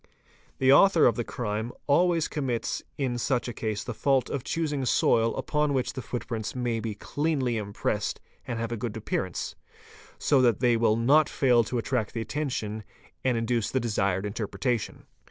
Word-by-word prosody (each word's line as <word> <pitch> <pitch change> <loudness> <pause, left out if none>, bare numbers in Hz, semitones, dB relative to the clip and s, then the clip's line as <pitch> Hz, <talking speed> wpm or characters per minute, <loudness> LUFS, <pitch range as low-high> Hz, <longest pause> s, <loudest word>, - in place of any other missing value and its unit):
The 130 0 +5
author 185 +2 +6
of 115 - +4
the 120 - -1
crime 110 0 -3
always 165 +2 +3
commits 130 -6 -2 0.2
in 125 -4 -1
such 125 0 0
a 120 - -4
case 110 -2 -3
the 120 - -5
fault 135 +3 +1
of 140 -4 -2
choosing 150 -4 -1
soil 115 -2 +3
upon 150 -2 0
which 130 - -1
the 130 - -5
footprints 115 -2 -4
may 120 -2 -1
be 110 -2 -4
cleanly 135 0 -1
impressed 105 0 -2 0.3
and 120 - -3
have 115 0 -3
a 120 - -2
good 115 0 -4
appearance, 95 -4 -3 0.6
so 140 -3 +3
that 120 -3 +3
they 120 -2 +3
will 115 -1 +3
not 140 +7 +4
fail 125 -4 +3
to 125 - -3
attract 115 -2 -1
the 115 - -1
attention 110 -6 -3 0.4
and 125 -2 +2
induce 115 -1 0
the 130 - 0
desired 100 -5 0
interpretation. 115 +3 -3
120 Hz, 175 wpm, -27 LUFS, 110-135 Hz, 0.6 s, author